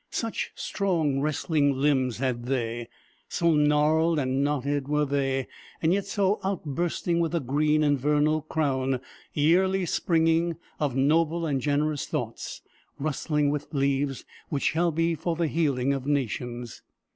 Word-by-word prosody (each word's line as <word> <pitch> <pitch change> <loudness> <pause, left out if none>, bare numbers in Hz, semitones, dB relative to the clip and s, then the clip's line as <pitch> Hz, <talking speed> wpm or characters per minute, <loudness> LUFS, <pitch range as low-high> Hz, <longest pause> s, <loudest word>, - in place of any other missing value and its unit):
Such 225 -2 -2
strong, 165 -9 0
wrestling 145 -1 +1
limbs 130 -4 +1
had 125 -2 -2
they, 120 -3 -2 0.4
so 170 -1 +2
gnarled 150 +2 +3
and 135 -1 0
knotted 145 -1 -1
were 150 0 +1
they, 135 -2 0 0.3
yet 190 +5 +1
so 200 0 +1
outbursting 170 -1 -1
with 170 0 0
a - - +2
green 150 +3 +1
and 145 -2 +2
vernal 150 +3 +2
crown, 135 -4 0 0.3
yearly 185 +5 +3
springing, 165 0 +2 0.2
of 145 -4 0
noble 160 +4 +2
and 140 -4 0
generous 145 0 0
thoughts, - - -4 0.3
rustling 150 0 0
with 150 +1 -4
leaves 135 0 0 0.2
which 145 -4 -2
shall 170 +1 +2
be 165 +1 +1
for 165 +2 -2
the 170 +1 0
healing 140 -4 +1
of 135 -1 -4
nations. 120 -4 -2
150 Hz, 135 wpm, -27 LUFS, 135-165 Hz, 0.4 s, gnarled